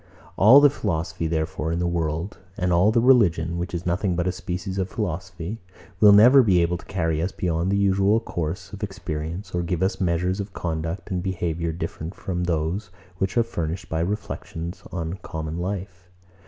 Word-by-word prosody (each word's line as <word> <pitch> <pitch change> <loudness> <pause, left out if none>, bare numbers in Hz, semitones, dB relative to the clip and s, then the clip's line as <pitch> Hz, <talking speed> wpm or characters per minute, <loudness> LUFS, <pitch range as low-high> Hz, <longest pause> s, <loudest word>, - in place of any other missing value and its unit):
All 115 +8 +8
the 145 -1 +6
philosophy, 80 - -2
therefore, 80 0 -2
in 85 - -1
the 90 - 0
world, 85 +1 -2 0.2
and 90 0 +1
all 90 +5 +5
the 115 - +3
religion, 90 -10 +3
which 90 - -3
is 85 -1 -4
nothing 90 +1 0
but 85 0 0
a 90 - +1
species 95 +2 -4
of 95 0 -1
philosophy, 90 0 -4 0.4
will 105 0 +8
never 120 +7 +8
be 95 -7 +4
able 85 +1 +1
to - - -14
carry 80 -4 -1
us 90 +3 -1
beyond 85 +1 -1
the 100 - +2
usual 100 +2 +3
course 90 -1 -4
of 105 - -8
experience, 90 -1 -5
or 90 - 0
give 85 +1 -1
us 95 - 0
measures 90 +2 0
of 100 0 -5
conduct 80 +3 -4
and 90 -1 -1
behaviour 85 -3 -2
different 80 +1 -5
from 90 -2 -3
those 85 +4 -1 0.3
which 95 +2 -1
are 115 - +5
furnished 85 -6 -4
by 80 - -1
reflections 85 -2 -4
on 85 +1 -4
common 80 -1 -5
life. 95 0 -5
90 Hz, 185 wpm, -24 LUFS, 85-95 Hz, 0.4 s, All